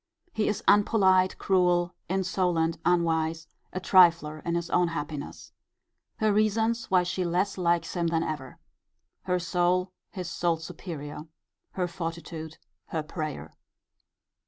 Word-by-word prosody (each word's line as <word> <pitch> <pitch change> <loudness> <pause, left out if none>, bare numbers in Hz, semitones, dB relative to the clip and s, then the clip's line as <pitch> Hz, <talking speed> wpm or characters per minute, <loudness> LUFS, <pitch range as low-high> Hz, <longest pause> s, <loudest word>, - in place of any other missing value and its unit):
He 215 - 0
is 210 - -1
unpolite, 190 -3 +4
cruel, 180 -2 +2 0.2
insolent, 180 -3 0
unwise, 165 -2 +1 0.3
a 185 - -3
trifler 170 -5 +4
in 170 0 -1
his 170 0 -3
own 180 0 +3
happiness. 150 -3 -6 0.7
Her 215 -1 +2
reasons 220 +2 +1
why 185 -1 +4
she 180 +1 -2
less 180 +3 0
likes 175 -2 0
him 170 -2 0
than 165 0 +1
ever. 140 -5 -5 0.7
Her 180 -1 +1
soul 180 +1 +1 0.2
his 180 -2 -6
soul's 170 -2 -1
superior. 150 -4 -7 0.5
Her 180 -2 -1
fortitude. 165 -2 -6 0.3
Her 160 -2 -3
prayer. 155 -1 -5
175 Hz, 125 wpm, -27 LUFS, 165-185 Hz, 0.7 s, unpolite